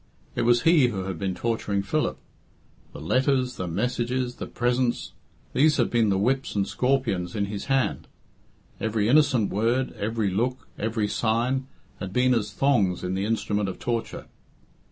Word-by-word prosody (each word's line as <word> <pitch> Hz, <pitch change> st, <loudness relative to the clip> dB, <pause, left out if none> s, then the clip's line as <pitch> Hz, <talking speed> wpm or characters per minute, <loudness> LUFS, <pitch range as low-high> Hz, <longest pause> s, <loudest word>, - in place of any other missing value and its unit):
It -, -, -1 dB
was 120 Hz, 0 st, +3 dB
he 165 Hz, -6 st, +5 dB
who 100 Hz, -6 st, -3 dB
had 95 Hz, -3 st, -5 dB
been 95 Hz, -2 st, -2 dB
torturing 105 Hz, -4 st, -1 dB
Philip. 155 Hz, +9 st, -1 dB, 0.7 s
The -, -, -9 dB
letters, 130 Hz, -, +1 dB
the 90 Hz, -, -3 dB
messages, 125 Hz, +6 st, -1 dB
the -, -, -5 dB
presents, 120 Hz, 0 st, -1 dB, 0.4 s
these 150 Hz, +2 st, +4 dB
had 120 Hz, -, +1 dB
been 115 Hz, -3 st, +3 dB
the 95 Hz, -, +2 dB
whips 130 Hz, +6 st, 0 dB
and 100 Hz, -1 st, +1 dB
scorpions 125 Hz, -10 st, 0 dB
in 100 Hz, -1 st, 0 dB
his 100 Hz, 0 st, -5 dB
hand. 135 Hz, -2 st, 0 dB, 0.7 s
Every 110 Hz, -1 st, 0 dB
innocent 130 Hz, -5 st, +3 dB
word, 115 Hz, +6 st, +1 dB
every 110 Hz, -1 st, -1 dB
look, 125 Hz, +7 st, -1 dB
every 110 Hz, -1 st, -1 dB
sign, 120 Hz, +5 st, 0 dB, 0.3 s
had 95 Hz, -1 st, -5 dB
been 125 Hz, +2 st, +3 dB
as 110 Hz, -3 st, 0 dB
thongs 105 Hz, -10 st, +1 dB
in 90 Hz, 0 st, -2 dB
the 95 Hz, +1 st, -1 dB
instrument 105 Hz, -2 st, 0 dB
of 95 Hz, -, -6 dB
torture. 120 Hz, -2 st, -3 dB
115 Hz, 160 wpm, -25 LUFS, 100-130 Hz, 0.7 s, he